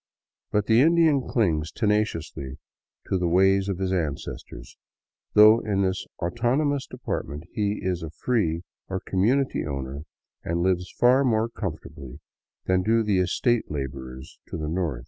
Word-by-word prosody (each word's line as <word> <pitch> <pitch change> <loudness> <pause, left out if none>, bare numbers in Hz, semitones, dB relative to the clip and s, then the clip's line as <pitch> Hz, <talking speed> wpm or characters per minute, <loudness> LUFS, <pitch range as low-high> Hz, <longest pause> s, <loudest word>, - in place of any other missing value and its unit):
But 105 -1 +1
the 115 +3 +5
Indian 160 -2 +4
clings 80 -9 0
tenaciously 105 - -1 0.5
to 95 - -1
the 90 - 0
ways 95 +3 +3
of 95 - -2
his 95 0 -1
ancestors, 70 -6 -5 0.6
though 110 +2 +8
in 100 -3 0
this 95 0 -2
autonomous 130 - 0
department 75 - -5
he 105 0 -1
is 90 -2 -1
a 80 - -5
free 85 -3 -1 0.2
or 95 0 -3
community 120 +11 +1
owner 70 0 -5 0.4
and 85 +1 -1
lives 90 -1 0
far 125 +3 +5
more 115 -3 +1
comfortably 75 - -7 0.5
than 95 0 +2
do 115 +3 +2
the 105 -3 +1
estate 110 +6 +1
laborers 65 -1 -6
to - - -5
the 75 -1 -4
north. 80 -7 -2
95 Hz, 145 wpm, -25 LUFS, 80-110 Hz, 0.6 s, though